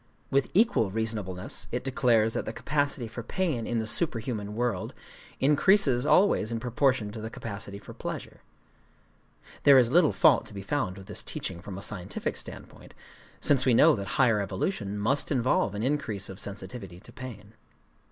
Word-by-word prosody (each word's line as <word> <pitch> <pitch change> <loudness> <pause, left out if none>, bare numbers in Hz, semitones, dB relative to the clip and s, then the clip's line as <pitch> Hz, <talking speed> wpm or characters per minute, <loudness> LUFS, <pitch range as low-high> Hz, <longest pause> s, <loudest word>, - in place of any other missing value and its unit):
With 135 0 +2
equal 205 - +3
reasonableness 105 -3 -3
it 125 - -2
declares 120 -5 +2
that - - -2
the 110 - -4
capacity 140 -2 -1
for 120 +2 -7
pain 135 -2 -2
in 120 - -1
the 110 - -1
superhuman 110 -5 -1
world 120 -6 -2 0.4
increases 145 -2 +4
always 165 - +4
in 115 - -2
proportion 125 -2 0
to 110 +1 -7
the 110 - -5
capacity 100 -3 -7
for 100 - -11
pleasure. - - -7 1.2
(There 140 -1 +7
is 120 -2 +4
little 170 -1 +5
fault 155 -7 +4
to 105 - -13
be 100 - -6
found 100 -4 -2
with 95 - -11
this - - -3
teaching 85 -2 -5
from 95 -1 -8
a 100 - -6
scientific 95 -5 -4
standpoint,—since 135 -3 -4
we 125 -3 +3
know - - +6
that 100 -3 -5
higher 115 -6 +4
evolution 100 - -3
must 130 +10 +1
involve 125 -6 +1
an 105 - -3
increase 120 -8 -1
of 95 +1 -8
sensitivity 100 -2 -6
to 100 - -16
pain.) 110 -5 -9
115 Hz, 165 wpm, -28 LUFS, 100-135 Hz, 1.2 s, There